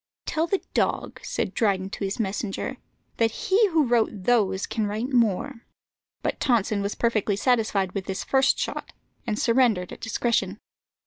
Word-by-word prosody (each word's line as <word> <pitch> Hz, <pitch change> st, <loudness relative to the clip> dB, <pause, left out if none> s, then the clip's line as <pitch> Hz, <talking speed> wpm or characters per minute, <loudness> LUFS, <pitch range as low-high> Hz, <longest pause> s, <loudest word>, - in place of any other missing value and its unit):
"Tell 320 Hz, +1 st, 0 dB
the 390 Hz, +2 st, -1 dB
dog," -, -, 0 dB
said -, -, -2 dB
Dryden 195 Hz, -3 st, 0 dB
to -, -, -5 dB
his 195 Hz, +4 st, -2 dB
messenger, 200 Hz, -1 st, -2 dB, 0.4 s
"that 230 Hz, -1 st, +3 dB
he 425 Hz, -, +2 dB
who 320 Hz, -5 st, +2 dB
wrote 235 Hz, -2 st, +3 dB
those 200 Hz, -2 st, +1 dB
can 215 Hz, -2 st, -2 dB
write 220 Hz, +6 st, -3 dB
more." 230 Hz, +2 st, +1 dB, 0.6 s
But -, -, -1 dB
Tonson 220 Hz, -5 st, +1 dB
was 200 Hz, +1 st, -2 dB
perfectly 220 Hz, -3 st, +1 dB
satisfied 215 Hz, -5 st, +1 dB
with 195 Hz, -1 st, -4 dB
this 190 Hz, -1 st, -3 dB
first 270 Hz, 0 st, +3 dB
shot, -, -, -4 dB, 0.3 s
and 215 Hz, -2 st, -1 dB
surrendered 230 Hz, -7 st, +2 dB
at -, -, -11 dB
discretion. 230 Hz, +1 st, 0 dB
225 Hz, 155 wpm, -25 LUFS, 200-245 Hz, 0.6 s, that